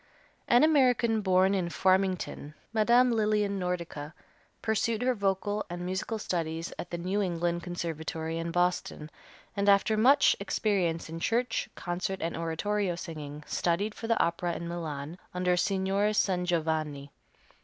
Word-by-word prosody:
An 240 +4 +5
American, 250 -7 +3
born 190 0 +3
in 180 -3 0
Farmington, 185 -5 0 0.2
Me., 220 -1 +3
Lillian 215 -4 +3
Nordica 170 -4 -4 0.5
pursued 220 +1 0
her 255 0 +3
vocal 205 0 -1
and 175 +1 -5
musical 190 +5 -2
studies 165 -5 -3
at - - -5
the 170 - -4
New 185 +4 -1
England 175 -2 -1
Conservatory, 165 -2 -4
in 165 0 -3
Boston, 175 -3 -1 0.4
and 200 0 +2
after 200 +2 +4
much 265 +7 +5
experience 190 -5 0
in 165 +1 -6
church, 230 +7 0
concert 185 +2 -3
and 165 +1 -2
oratorio 175 +4 -1
singing, 150 -4 -7
studied 190 +5 0
for 225 - -7
the 230 -1 +2
opera 170 0 0
in 170 - -5
Milan, 160 -1 -5 0.2
under 180 0 +2
Signor 195 +3 +1
Sangiovanni. 160 -7 0
180 Hz, 135 wpm, -29 LUFS, 165-210 Hz, 0.5 s, An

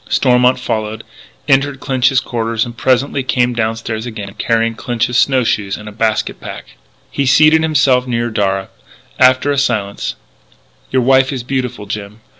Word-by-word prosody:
Stormont 125 -1 +3
followed, 110 -3 -3 0.4
entered 140 0 +2
Clinch's 130 -1 +2
quarters, 115 -3 -2
and 120 0 -9
presently 130 +3 +1
came 125 -1 0
downstairs 115 0 -3
again, 105 -4 -7
carrying 115 0 +1
Clinch's 120 +1 -2
snow 130 0 +3
shoes 100 -3 -1
and 105 - -11
a - - -7
basket 110 0 -1
pack. - - -9 0.4
He 140 - -1
seated 155 +4 +5
himself 135 -5 +2
near 120 -1 -1
Darragh. 95 -2 -1 0.5
After 130 +2 +4
a 140 - +1
silence: 105 -7 -2 0.8
"Your 130 - +2
wife 130 +1 +4
is 130 -3 -4
beautiful, 125 -4 -3
Jim.... 105 +1 -6
120 Hz, 150 wpm, -16 LUFS, 110-130 Hz, 0.8 s, seated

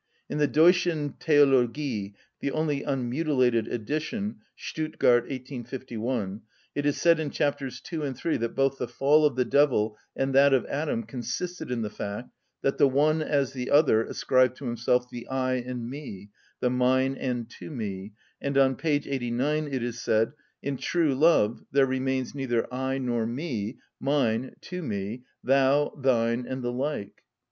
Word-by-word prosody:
In - - -2
the 150 - +4
"Deutschen 160 0 +3
Theologie" 135 -7 +2 0.2
(the - - -1
only 150 -1 0
unmutilated 130 -3 +1
edition, 155 - -3 0.2
Stuttgart, 140 -6 +1
1851) 125 -5 -4 0.3
it 145 0 -1
is 145 - 0
said 170 -1 +4
in 155 -2 -2
chapters 145 -3 -2
2 165 -4 -5
and 135 -3 -3
3 165 - 0
that 115 0 -3
both 135 0 +1
the 125 - -2
fall 145 +6 +4
of 140 - -4
the 125 -1 +1
devil 120 -8 +3 0.2
and 135 0 -1
that 140 0 +6
of 130 - 0
Adam 140 -5 -2
consisted 130 +10 -5
in 120 -2 -1
the 105 - -3
fact 105 +4 -5 0.3
that 135 - 0
the - - +7
one 150 +4 +2
as 140 -4 0
the 125 -2 -4
other 145 -7 +5
ascribed 130 +1 +2
to 140 - -8
himself 120 +1 +1
the 120 -1 -8
I 130 -1 0
and 125 -1 -5
me, 120 -8 -8 0.3
the 125 - +2
mine 130 +1 +2
and 125 -3 -3
to - - -8
me, 105 -7 -5 0.3
and 140 0 -1
on 135 -1 +4
p. 165 - -5
89 140 +1 0
it 130 -4 -2
is 120 -1 -4
said: 110 +1 +2 0.3
"In 140 -1 -2
true 165 -2 +1
love 130 -6 +3
there 140 -1 +5
remains 130 -1 -1
neither 130 -5 0
I 130 +1 -1
nor 120 -4 -1
me, 120 -4 -3 0.2
mine, 130 -3 0
to 180 0 -6
me, 105 - -4 0.2
thou, 135 +2 +3
thine, 120 -3 +1
and 130 -1 -4
the 120 0 -2
like." 130 -5 -3
130 Hz, 165 wpm, -27 LUFS, 120-145 Hz, 0.3 s, the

